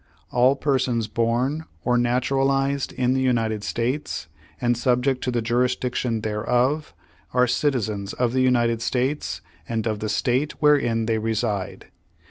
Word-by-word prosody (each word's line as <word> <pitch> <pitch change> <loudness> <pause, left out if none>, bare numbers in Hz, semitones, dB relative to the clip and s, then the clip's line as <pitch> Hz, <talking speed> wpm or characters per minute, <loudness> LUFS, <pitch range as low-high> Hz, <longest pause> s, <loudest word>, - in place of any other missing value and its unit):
All 125 +3 +4
persons 130 -6 0
born 120 +8 0 0.2
or 125 - +3
naturalized 135 +3 +1
in 125 0 +1
the 130 - +1
United 115 -5 0
States, 125 +7 -2 0.3
and 120 0 +2
subject 125 +2 +1
to - - 0
the 120 -2 -1
jurisdiction 125 -1 0
thereof, 125 +7 0 0.4
are 125 0 +5
citizens 110 -6 -1
of 125 -1 0
the 130 - +2
United 120 -3 +2
States 125 - -1 0.3
and 115 -2 -1
of 110 -2 -1
the 110 - -3
State 125 +7 0
wherein 130 -7 +3
they 110 0 0
reside. 110 -3 -2
125 Hz, 135 wpm, -23 LUFS, 115-130 Hz, 0.4 s, are